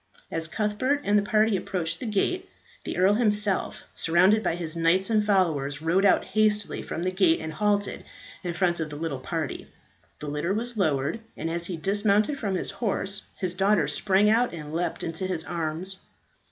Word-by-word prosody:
As 165 0 -2
Cuthbert 220 - 0
and 205 - +2
the 205 - +5
party 215 0 +2
approached 180 -4 -2
the 250 - -4
gate, 360 - 0 0.4
the - - -4
earl 190 +3 +5
himself, 210 -3 0
surrounded 185 +6 +4
by 165 - 0
his 170 -2 -4
knights 170 +5 +2
and 215 -1 +3
followers, 160 -9 +1
rode 170 +5 +2
out - - +4
hastily 210 0 +1
from 170 - -4
the 185 - 0
gate 185 -3 +3
and 160 0 -5
halted 205 +2 0 0.4
in 175 -2 -3
front 175 -1 +1
of 160 -1 -2
the 150 - -7
little 150 -3 -3
party. 160 +1 -4 0.5
The - - -8
litter 150 +6 -1
was 240 +2 -3
lowered, 155 -1 0 0.2
and 165 - -3
as 170 0 -3
he 180 - -4
dismounted 205 - +1
from 200 -3 -1
his 185 - -3
horse 200 -1 -2
his 185 -2 -2
daughter 190 -4 +2
sprang 190 +7 +2
out 225 -2 +3
and 150 -1 -8
leapt 170 +2 -2
into 165 +3 -3
his 175 -4 -2
arms. 170 +3 -4
190 Hz, 185 wpm, -26 LUFS, 165-210 Hz, 0.5 s, the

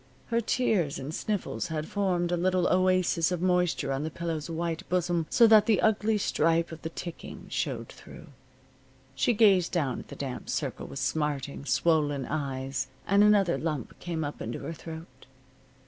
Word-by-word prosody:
Her 235 0 +1
tears 210 - +1
and 140 +4 -6
sniffles 205 +2 -2
had 155 -1 -3
formed 180 -4 0
a - - +2
little 180 0 +1
oasis 185 -2 +2
of 180 - -1
moisture 180 -5 +1
on 135 +1 -1
the 160 - -2
pillow's 165 -1 -4
white 165 0 -2
bosom 175 -2 0
so 235 - +6
that 220 -2 +6
the 215 -4 +4
ugly 220 0 +2
stripe 165 -3 +1
of 160 - -9
the 160 - -4
ticking 170 0 -8
showed - - -3
through. - - -12 0.9
She 245 - +2
gazed 200 -6 +4
down 140 -8 0
at - - -11
the - - -9
damp 135 -3 -6
circle - - -3
with - - -8
smarting, 140 0 -2
swollen 145 -4 +1
eyes, 135 -3 -3 0.2
and 200 +1 +4
another 200 -8 +4
lump 150 -4 -4
came 165 -3 -3
up 145 0 -5
into 115 +2 -4
her 165 - -5
throat. 160 -5 -10
170 Hz, 170 wpm, -28 LUFS, 150-185 Hz, 0.9 s, so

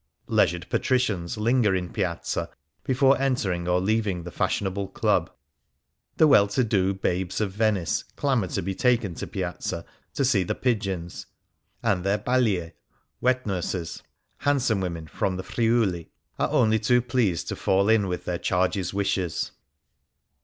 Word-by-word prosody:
Leisured 85 +1 +1
patricians 110 -10 0
linger 110 -2 +2
in 90 -1 -2
Piazza 90 -4 -2 0.3
before 135 +1 +3
entering 100 -11 0
or 90 0 +3
leavins: 100 -2 0
the 90 - -7
fashionable 95 +2 -1
club. - - +1 0.9
The 160 - +6
well 120 -9 +6
to 100 +6 +1
do 95 -4 +1
babes 95 -1 -1
of 105 -3 0
Venice 105 -4 +1
clamour 130 -9 +1
to - - -3
be 95 +2 -2
taken 115 -4 +1
to - - -6
Piazza - - -4 0.3
to 140 - +1
see 120 -7 +3
the 90 - -2
pigeons, 95 -8 -2 0.6
and 90 -2 +1
their 100 +2 +2
bcdk 105 -7 +1 0.5
(wet 130 +1 +2
nurses) 90 -3 -3 0.2
— - - -47
handsome 125 -8 +1
women 85 -3 -4
from 90 +5 -2
the 95 - -5
Friuli 110 -7 0
— - - -39
are - - +1
only 110 0 +3
too 125 +2 +3
pleased 115 -9 0
to - - -2
fall 95 +1 +2
in 110 -3 +4
with 90 -1 -4
their 85 -1 -2
charges' 95 0 0
wishes. 95 -4 -1
100 Hz, 155 wpm, -25 LUFS, 90-115 Hz, 0.9 s, The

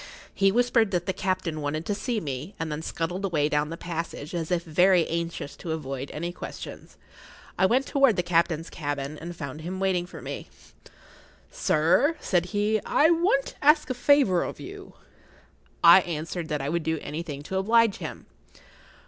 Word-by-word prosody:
He 195 0 +3
whispered 235 -1 +3
that 175 -2 -1
the 190 - -1
captain 180 -5 -2
wanted 155 +3 -3
to 205 - -1
see 230 +2 -2
me, 145 +2 -5
and 165 -1 -3
then 150 +1 -3
scuttled 170 +4 -3
away 160 -6 +1
down 150 0 0
the 165 - -6
passage 165 -3 -5
as 165 -2 -3
if 175 -2 0
very 175 +1 +4
anxious 165 -3 -4
to 165 - -4
avoid 135 -3 -5
any 170 +3 -4
questions. - - -9 0.6
I 190 - +3
went 255 +6 +2
toward 275 -6 +3
the 180 - 0
captain's 170 -1 +1
cabin, 145 -2 -4
and 170 +1 -7
found 145 -1 -6
him 185 +4 -5
waiting 185 -2 0
for - - -10
me. - - -7 1.0
"Sir," 170 - +2
said 175 -2 +1
he, 210 +2 0
"I 315 +3 +4
want 335 -5 +2
to - - -11
ask 300 -2 +4
a - - +1
favour 250 -8 +4
of - - -5
you." 395 +1 -10 0.9
I 170 +2 +9
answered 165 0 -4
that 150 -3 -2
I 140 - -2
would 170 +2 0
do 160 0 -1
anything 150 -2 -5
to 190 +5 -3
oblige 225 +1 +3
him. - - -7
175 Hz, 180 wpm, -26 LUFS, 155-205 Hz, 1.0 s, I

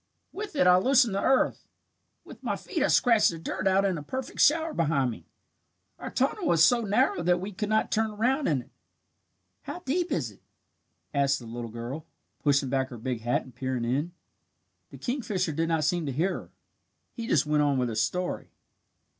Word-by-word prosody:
With 410 -3 -6
it 230 - +3
I 180 0 +7
loosen 255 +1 +4
the 195 - -1
earth. 265 - +1 0.6
With - - -12
my - - -1
feet 340 -6 -4
I 290 - +4
scratch 235 -7 +4
the 165 - -5
dirt 190 +4 -3
out 190 +1 +3
in 185 -5 0
a - - -7
perfect 260 - -6
shower 320 +1 +4
behind 145 -6 +1
me. 85 -7 -11 0.7
Our - - -5
tunnel 295 +7 0
is 165 -1 +5
so 235 +7 +5
narrow 205 -4 +1
that 175 +1 +2
we 195 +3 -5
could 210 +2 -4
not 220 0 +1
turn 220 0 +1
around 250 +7 0
in 135 -5 +1
it." - - -26 0.9
"How 355 - -7
deep 350 +4 -1
is - - -1
it?" - - -21 0.7
asked 140 -1 +2
the 120 - -10
little 115 0 -6
girl, 120 +8 -6 0.3
pushing 140 -2 +2
back 135 0 0
her 120 - -8
big 120 0 -3
hat 120 +2 0
and 130 - -15
peering 125 0 -3
in. 140 +8 -1 0.8
The - - -11
kingfisher 210 - -2
did 165 +2 -1
not 160 -2 +1
seem 165 +1 0
to - - -1
hear 170 +9 0
her. - - -8 0.6
He 230 -2 -6
just 145 - +3
went 150 0 +2
on 145 -2 +2
with 125 -1 0
his 110 -1 0
story. 180 +12 -2
175 Hz, 200 wpm, -27 LUFS, 135-225 Hz, 0.9 s, I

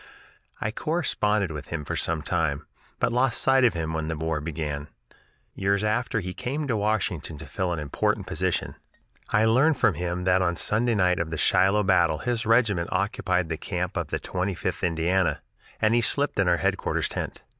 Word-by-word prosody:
I 105 - -2
corresponded 105 - 0
with 75 -1 -7
him 80 -3 -4
for - - -3
some 80 -2 -1
time, 80 -6 -1 0.3
but - - +1
lost 125 -1 +2
sight 135 0 +4
of 120 - +4
him 80 -1 -2
when 80 -1 -2
the 80 -1 -3
war 80 -1 -2
began. 75 -2 -4 0.7
Years 100 +1 0
after 110 +1 0
he 90 0 -5
came 140 +7 -3
to 120 - 0
Washington 100 -7 -1
to 80 - -9
fill 90 +5 -2
an 85 - -1
important 75 -3 -1
official - - -1
position. - - -2 0.6
I 105 +1 +4
learned 130 +7 +4
from 115 -6 +3
him 90 +2 -3
then 90 0 +3
that - - 0
on 85 -1 +1
Sunday 115 +6 +1
night 90 -3 +2
of 85 -1 -2
the 80 - -4
Shiloh 95 +6 +4
battle 85 -5 +3
his 120 +1 -2
regiment 110 -7 +3
occupied 95 -3 0
the 80 - -2
camp - - -3
of - - -2
the - - -2
Twenty 95 +1 -2
fifth - - -3
Indiana, 85 +2 +1 0.4
and 110 0 +3
he 120 - +4
slept 140 0 0
in 100 - +3
our 90 -1 +4
headquarters - - 0
tent. - - -5
95 Hz, 200 wpm, -26 LUFS, 80-110 Hz, 0.7 s, sight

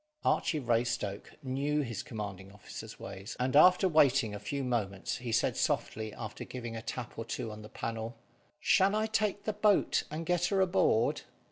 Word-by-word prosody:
Archy 155 - +2
Raystoke 120 -5 -1
knew 140 +3 0
his 115 -5 -3
commanding 100 -4 -6
officer's 105 - -9
ways, 100 +6 -7
and 130 +2 0
after 180 +5 +7
waiting 140 - +4
a 105 - -5
few 140 +4 -3
moments, 105 -7 -1
he 120 -2 -5
said 115 - +2
softly, 110 -1 -1
after 105 -2 -6
giving 120 -3 -6
a 115 - -4
tap 120 +1 -6
or - - -2
two 115 0 -4
on 105 0 -8
the 105 - -10
panel 115 +1 -4 0.4
"Shall 195 +2 +4
I 215 0 +2
take 210 -2 0
the 215 - -1
boat 210 0 +3
and 160 +2 -4
get 175 0 +2
her 195 +2 +1
aboard?" 175 - +3
125 Hz, 175 wpm, -31 LUFS, 110-160 Hz, 0.4 s, after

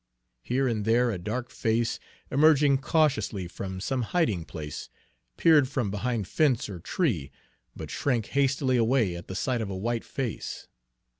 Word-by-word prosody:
Here 130 - 0
and 110 -4 -1
there 120 +3 +3
a 95 - -3
dark 120 +7 -4
face, 115 -2 0 0.3
emerging 145 -1 +5
cautiously 140 - +1
from 95 +1 -6
some 125 +7 -1
hiding 110 - 0
place, 75 -3 -7 0.5
peered 155 -5 +5
from 125 -8 -1
behind 110 -1 -2
fence 140 - +2
or 95 -3 -6
tree, 90 - -1 0.5
but - - -7
shrank 120 -6 0
hastily 135 -2 +2
away 115 -5 +2
at 85 - -9
the 95 - -6
sight 120 +4 0
of 105 - -3
a 95 - -4
white 115 +4 -2
face. 130 -5 -5
120 Hz, 155 wpm, -27 LUFS, 100-135 Hz, 0.5 s, emerging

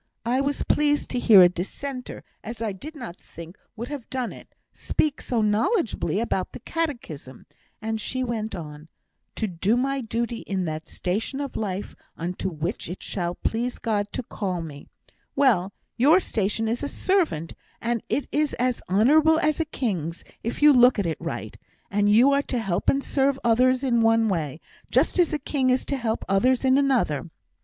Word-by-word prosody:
I 250 +3 +2
were 280 +1 +1
pleased 295 -1 +2
to 250 - 0
hear 210 -6 +8
a - - +8
Dissenter, 250 +9 -6 0.2
as 230 +2 -7
I 225 -2 -1
did 295 +12 -9
not 235 - -8
think 170 +2 -11 0.2
would 235 +3 -6
have 285 -5 -7
done 255 -3 -3
it, - - -15 0.2
speak 300 -2 -1
so 235 -3 0
knowledgeably 215 - +1
about 205 -5 -2
the - - -7
catechism, 235 - -5 0.4
and 220 0 -2
she 255 +4 -2
went 225 -3 -3
on: 150 -2 -8 0.5
'"to 220 - -1
do 200 +4 +1
my 270 +2 0
duty 235 +1 -2
in 190 -4 -3
that 155 0 -5
station 210 +9 -2
of 280 -2 -4
life 200 -2 -3 0.2
unto 180 +3 -3
which 165 +1 -4
it 180 - -7
shall 175 -2 -2
please 240 +2 -2
God 210 -3 -1
to - - -3
call 185 -6 -3
me;" 145 -3 -9 0.5
well, 220 -10 +3 0.3
your 295 +9 +6
station 220 - -1
is 230 +2 -1
a 290 - -2
servant, 315 - 0 0.3
and 235 -1 -1
it 285 - -1
is 300 0 +1
as 250 -1 0
honourable 300 +11 +5
as 305 -1 +1
a 325 - +1
king's, 185 - -3 0.2
if 230 +5 -3
you 300 -1 +9
look 245 -1 +6
at 200 - 0
it 160 -3 -3
right; - - -5 0.4
you 210 +6 +5
are 280 0 +3
to 260 - -3
help 195 -5 0
and 275 0 +2
serve 275 0 +1
others 250 +3 +3
in 240 -3 +2
one 225 0 +4
way, 155 -5 -2 0.3
just - - +2
as 345 - +4
a 305 - 0
king 270 -3 0
is 255 0 +2
to 280 - -1
help 230 -4 -2
others 250 +7 +2
in 260 +1 +5
another. 240 - +1
230 Hz, 180 wpm, -25 LUFS, 190-270 Hz, 0.5 s, you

